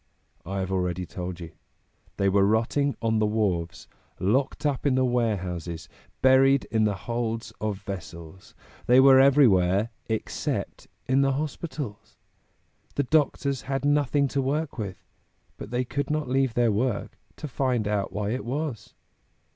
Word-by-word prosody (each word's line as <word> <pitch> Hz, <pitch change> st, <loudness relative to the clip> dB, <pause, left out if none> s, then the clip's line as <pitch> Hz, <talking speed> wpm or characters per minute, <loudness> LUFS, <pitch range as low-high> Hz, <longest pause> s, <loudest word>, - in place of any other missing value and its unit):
I 95 Hz, +1 st, -2 dB
have 95 Hz, 0 st, -3 dB
already 90 Hz, -1 st, -1 dB
told 90 Hz, 0 st, -6 dB
you; 85 Hz, -2 st, -8 dB, 0.7 s
they 100 Hz, -, +2 dB
were 100 Hz, 0 st, +3 dB
rotting 115 Hz, +7 st, +1 dB
on 110 Hz, -1 st, +2 dB
the 105 Hz, -, +2 dB
wharves, 95 Hz, -6 st, -1 dB, 0.3 s
locked 130 Hz, -, 0 dB
up 145 Hz, -1 st, 0 dB
in 130 Hz, -, +2 dB
the 130 Hz, 0 st, +3 dB
warehouses, 95 Hz, -9 st, -2 dB, 0.4 s
buried 135 Hz, +1 st, +5 dB
in 110 Hz, -1 st, +2 dB
the 105 Hz, -1 st, +1 dB
holds 115 Hz, -1 st, -3 dB
of 105 Hz, -2 st, -3 dB
vessels; 90 Hz, -2 st, -9 dB, 0.3 s
they 125 Hz, +1 st, +6 dB
were 135 Hz, 0 st, +8 dB
everywhere 110 Hz, -7 st, +4 dB, 0.2 s
except 110 Hz, 0 st, -3 dB, 0.2 s
in 130 Hz, +2 st, +2 dB
the 135 Hz, -1 st, +2 dB
hospitals. 145 Hz, -5 st, -5 dB, 0.8 s
The 140 Hz, -, +1 dB
doctors 140 Hz, -2 st, +1 dB
had 135 Hz, 0 st, -1 dB
nothing 145 Hz, -1 st, +2 dB
to 140 Hz, -, 0 dB
work 140 Hz, +1 st, -2 dB
with, 100 Hz, -4 st, -6 dB, 0.5 s
but -, -, -9 dB
they 125 Hz, +2 st, -1 dB
could 140 Hz, +3 st, -3 dB
not 155 Hz, -1 st, -1 dB
leave 130 Hz, -2 st, +1 dB
their 120 Hz, -2 st, +3 dB
work 110 Hz, +1 st, -1 dB, 0.2 s
to 155 Hz, -, -6 dB
find 125 Hz, -5 st, 0 dB
out 105 Hz, -2 st, -1 dB
why 105 Hz, 0 st, -2 dB
it 125 Hz, -, -3 dB
was. 130 Hz, -4 st, -4 dB
115 Hz, 150 wpm, -26 LUFS, 100-135 Hz, 0.8 s, were